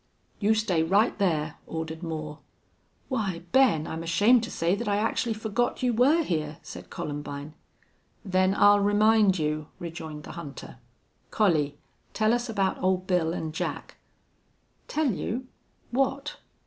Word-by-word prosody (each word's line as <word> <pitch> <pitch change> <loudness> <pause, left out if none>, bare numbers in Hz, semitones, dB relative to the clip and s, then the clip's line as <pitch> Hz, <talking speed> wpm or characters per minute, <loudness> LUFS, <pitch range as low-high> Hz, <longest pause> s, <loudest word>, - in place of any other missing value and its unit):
"You 215 +1 +3
stay 205 -7 +1
right 195 +7 +3
there," 160 -6 0
ordered 160 0 -5
Moore. 155 -3 -5 0.7
"Why, 195 -10 -2
Ben, 250 - +4
I'm 160 0 -5
ashamed 205 +9 +4
to - - -8
say 170 +2 0
that 210 +3 -2
I 205 - +2
actually 225 +1 0
forgot 220 +4 -1
you 245 -1 +2
were 280 +9 +4
here," 155 - -2
said 90 0 -10
Columbine. 145 0 -6 0.7
"Then 185 0 +2
I'll 205 0 +6
remind 205 -1 +4
you," 155 -1 -2
rejoined 160 -3 -7
the - - -9
hunter. 140 -7 -9 0.5
"Collie, 155 -9 +1 0.4
tell 220 +1 +3
us 240 0 -1
about 195 -4 0
Old 185 0 +1
Bill 180 -3 +1
an' 160 - -4
Jack." 160 - -4 0.9
"Tell 305 -4 +1
you? 235 +6 -3 0.5
What?" 275 +3 -1
190 Hz, 140 wpm, -27 LUFS, 160-220 Hz, 0.9 s, I'll